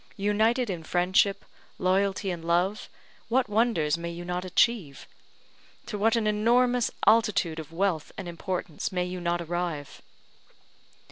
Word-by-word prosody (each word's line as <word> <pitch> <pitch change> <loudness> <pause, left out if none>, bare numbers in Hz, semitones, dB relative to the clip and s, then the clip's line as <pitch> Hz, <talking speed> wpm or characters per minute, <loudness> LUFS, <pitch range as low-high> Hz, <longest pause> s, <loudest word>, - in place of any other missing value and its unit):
United 220 +5 +2
in 180 -5 -4
friendship, 180 +4 +1 0.3
loyalty, 195 +1 +1
and 170 -2 -6
love, 175 +5 0 0.4
what 250 +2 +2
wonders 205 -8 +1
may 170 0 -4
you 170 +1 -7
not 180 +1 -3
achieve? 185 -5 +1 0.8
to 235 - -5
what 220 +3 +2
an 230 -2 0
enormous 240 +3 +2 0.2
altitude 215 -8 +3
of 160 0 -8
wealth 165 -3 -1
and 195 - -6
importance 175 -1 -4
may 180 -1 -1
you 180 0 -5
not 170 0 -1
arrive? 170 -4 -4
185 Hz, 135 wpm, -27 LUFS, 170-215 Hz, 0.8 s, altitude